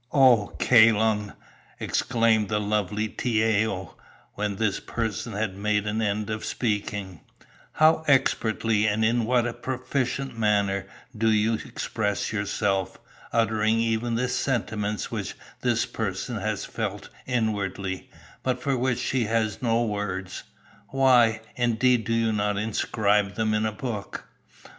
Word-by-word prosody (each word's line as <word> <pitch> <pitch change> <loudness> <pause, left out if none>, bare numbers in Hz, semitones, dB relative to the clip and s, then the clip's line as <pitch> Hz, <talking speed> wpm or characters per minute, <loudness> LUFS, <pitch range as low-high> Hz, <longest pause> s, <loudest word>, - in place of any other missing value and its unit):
"'O 125 -7 +5
Kai 115 -2 +7
Lung,' 105 -1 0 0.5
exclaimed 115 -3 +1
the 105 -1 +1
lovely 105 0 -1
Tiao, 110 -5 0 0.4
when 105 -1 -2
this 110 0 0
person 115 0 -3
had 105 -2 -2
made 105 +1 0
an 105 +1 -1
end 105 0 -1
of 110 0 -4
speaking, 105 - -3 0.5
'how 160 +1 +4
expertly 110 -5 +2
and 110 +1 +1
in 115 0 +2
what 120 0 +2
a 120 - -2
proficient 130 +1 -3
manner 100 -3 +1 0.3
do 110 +1 +2
you 110 +1 +3
express 110 -1 -2
yourself, 100 -2 -1 0.3
uttering 110 -1 +2
even 115 +1 0
the 125 +2 0
sentiments 105 -5 -2
which - - -4 0.3
this - - +1
person - - -3
has - - -2
felt - - -4 0.2
inwardly, 100 -6 -2 0.3
but 130 -1 -1
for 135 +1 0
which 125 -1 0
she 125 -1 0
has 110 -2 -1
no 115 -1 +2
words. 95 -3 -3 0.5
Why, 125 -5 +4
indeed, 120 -1 +2
do 115 - -1
you 115 -1 +1
not 105 -1 0
inscribe 105 -1 +1
them 110 -1 0
in 110 0 +1
a - - -2
book? 105 -4 -5
110 Hz, 135 wpm, -26 LUFS, 105-120 Hz, 0.5 s, Kai